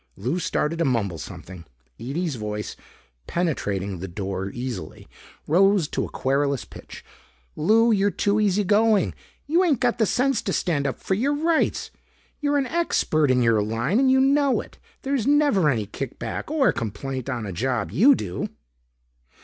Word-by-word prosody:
Lou 130 - -2
started 165 0 -1
to - - +2
mumble 105 - 0
something. 90 +4 -9 0.4
Ede's 155 +6 -3
voice, 105 -3 -5 0.5
penetrating 100 - -2
the 95 - -5
door 95 +1 -4
easily, 125 +3 -6 0.4
rose 195 0 +3
to - - -2
a - - -5
querulous 140 0 0
pitch. - - -12 0.5
"Lou, 225 +8 +4
you're 200 -1 +3
too 205 +1 0
easygoing! 210 +1 +2 0.3
You 335 +5 +3
ain't 310 -8 +2
got 245 -2 +1
the 220 - +3
sense 260 +2 +1
to - - -2
stand 145 -6 0
up 135 - -3
for - - -2
your 265 +9 +1
rights. 320 +2 0 0.5
You're 290 -1 +1
an 275 - +1
expert 250 - +1
in 125 -1 +3
your 115 -2 +3
line 115 - 0
and 265 -1 +4
you 265 0 +4
know 275 0 +3
it. - - -10 0.2
There's 270 -4 -1
never 285 - +3
any 115 -6 0
kick 125 +5 -6
back 115 - -5
or 300 -4 +3
complaint 130 +4 -5
on 120 -5 -3
a 100 - -5
job 115 -2 -1
you 235 - +6
do." 90 - -4
160 Hz, 165 wpm, -24 LUFS, -, 0.5 s, you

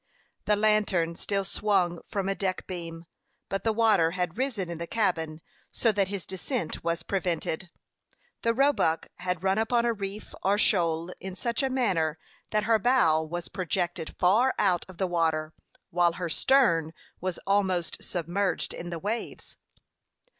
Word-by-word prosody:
The 210 - +3
lantern 205 -6 +2
still 195 +3 -1
swung 185 -4 +1
from 195 -3 -2
a 195 - +2
deck 190 -1 -2
beam, 170 -2 -6 0.4
but 195 0 -2
the 225 - +2
water 215 -7 +4
had 180 -2 -1
risen 245 -7 -1
in 170 -1 -6
the 170 - -4
cabin 165 -8 0 0.3
so 230 - +2
that 200 -2 +1
his 195 -1 -4
descent 190 - -3
was 170 0 -1
prevented. 180 -2 -2 0.7
The 230 0 +1
Roebuck 270 - +2
had 180 -1 -2
run 195 +2 +2
upon 235 +1 +2
a 235 - +2
reef 200 0 -6
or 200 +2 +2
shoal 170 -4 +2
in 190 0 -6
such 235 +5 -1
a 270 - +1
manner 185 -12 +1 0.3
that 210 -1 +1
her 220 0 +3
bow 175 -10 +4
was 170 +2 -5
projected 175 -2 -2
far 225 +9 +4
out 185 -4 +2
of 185 - -12
the 190 - +1
water, 160 -3 0 0.4
while 175 0 +3
her 175 -1 -4
stern 165 - +3 0.3
was 185 -1 -3
almost 190 -4 +1
submerged 180 +2 -1
in 175 - -6
the 170 - -3
waves. 210 +7 -4
185 Hz, 160 wpm, -28 LUFS, 170-210 Hz, 0.7 s, water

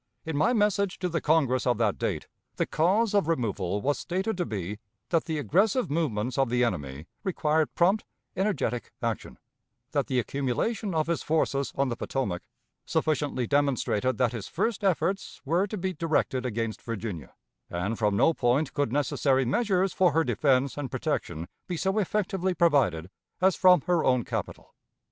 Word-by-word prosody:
In 160 -1 -3
my 155 +9 +3
message 205 -4 +1
to 180 - -2
the 165 -1 -1
Congress 135 -5 +2
of 120 -2 +2
that 110 -3 +1
date, - - -2 0.3
the - - 0
cause 200 +7 +2
of 200 -6 +3
removal 105 - -1
was 145 +1 +1
stated 190 +5 -2
to 175 - -1
be, 105 0 -4 0.3
that 165 -2 +1
the 160 -2 -2
aggressive 195 - +2
movements 130 -6 -1
of 135 -3 +2
the 125 +1 +2
enemy 75 - -3 0.2
required 160 -4 0
prompt, 190 +5 +3 0.3
energetic 190 - -1
action; - - -3 0.5
that - - 0
the 130 - 0
accumulation 140 - -1
of 155 -1 +2
his 170 0 -1
forces 140 -3 0
on 135 -1 +1
the 120 - -2
Potomac 115 -9 -2 0.4
sufficiently 145 -5 0
demonstrated 130 -4 +1
that 125 -3 +2
his 110 -5 -5
first 225 -3 -1
efforts 190 +1 0
were 170 +7 +2
to 215 - -5
be 185 0 -2
directed 150 -6 0
against 115 -1 -3
Virginia, 105 - -6 0.3
and 100 +6 -2
from 105 -2 +2
no 165 - +4
point 130 +3 +1
could 145 -5 0
necessary 135 -1 +1
measures 190 - +1
for 180 -5 +3
her 165 +1 +3
defense 135 -4 +1
and 140 -3 -3
protection 80 -6 -3 0.2
be 180 - -3
so 190 +5 +1
effectively 190 -2 0
provided 130 - +2 0.3
as 190 0 +4
from 180 -1 +6
her 175 -3 +1
own 125 -2 +3
capital. - - -5
145 Hz, 165 wpm, -27 LUFS, 120-180 Hz, 0.5 s, from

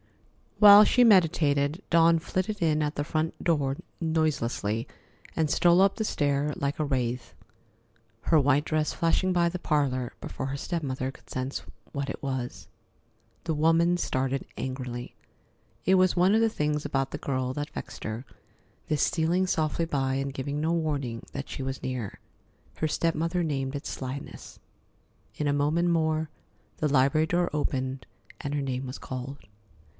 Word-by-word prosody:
While 205 0 +10
she 250 +3 +4
meditated, 160 -6 +3
Dawn 165 0 +5
flitted 185 +5 -3
in 155 -2 +2
at 150 +1 -2
the 145 - -1
front 155 +1 -2
door 145 -5 +1 0.2
noiselessly 140 -8 0 0.5
and 160 -2 +1
stole 175 +4 +4
up 195 0 +4
the 220 - -2
stair 145 -5 0
like 140 +1 -2
a - - +2
wraith, 125 -3 -2 0.9
her 160 +4 +3
white 145 +1 +3
dress 155 -1 0
flashing 170 +3 +1
by 170 -1 +3
the 180 +1 -5
parlor 135 -7 0
before 130 - -5
her 140 +1 -3
step 170 +4 -3
mother 130 -1 -2
could - - -20
sense 130 +2 -3 0.3
what 140 -1 -3
it - - -8
was. 130 -3 -4 0.8
The 160 -2 -1
woman 165 +3 +3
started 135 -4 -1
angrily. 125 -2 -5 0.7
It 190 - +5
was 185 -1 +4
one 185 +3 +4
of 225 - +4
the 225 - +4
things 150 -6 -1
about 135 -1 -1
the - - -4
girl 130 -2 -2
that 145 +2 -4
vexed - - -8
her, 110 +4 -4 0.6
this 150 -2 0
stealing 175 +3 +1
softly 160 -1 0
by 135 -4 0
and 135 0 -2
giving 140 +2 -3
no 160 +2 +1
warning 140 -8 -2
that 140 0 -6
she 135 - -5
was 135 0 -4
near. 125 -6 -4 0.6
Her 155 - -1
step 165 +2 0
mother 165 +3 0
named 135 -3 -2
it 140 - -5
"slyness." 135 +2 -7 0.8
In 150 - -1
a 145 - +2
moment 155 +5 +2
more 160 -2 +1 0.5
the 155 - +1
library 140 +3 +3
door 175 +1 +1
opened 130 -3 -2 0.3
and 140 - -4
her 145 - 0
name 130 -1 -3
was 130 +1 -6
called. 130 +2 -6
150 Hz, 165 wpm, -27 LUFS, 135-165 Hz, 0.9 s, While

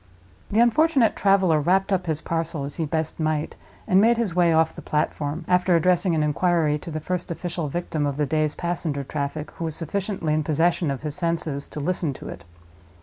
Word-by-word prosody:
The 210 - +1
unfortunate 260 0 +3
traveler 190 -5 +3
wrapped 190 +5 +2
up 185 -2 -1
his 155 -1 -1
parcel 165 -3 -2
as 140 +1 -6
he 160 - -1
best 160 +1 -3
might, 155 -1 -1 0.3
and 190 +1 +5
made 230 +2 +4
his 225 -7 -1
way 175 -1 +3
off 160 0 +3
the 170 - -9
platform, 150 +1 -2
after 180 0 +3
addressing 175 +1 +2
an 155 - +1
inquiry 150 0 +1
to 170 - -9
the 155 -1 -3
first 180 +3 -3
official 170 -1 -3
victim 155 -1 -2
of 140 -1 -3
the 150 - +1
day's 155 0 0
passenger 165 -5 -2
traffic, 145 +2 -4
who 165 - -6
was 160 -2 -3
sufficiently 180 -1 -2
in 155 0 +1
possession 165 +2 +1
of 140 0 -4
his 150 -2 -3
senses 165 -4 -2
to - - -7
listen 165 -1 -1
to - - -9
it. - - -9
165 Hz, 205 wpm, -24 LUFS, 150-180 Hz, 0.3 s, and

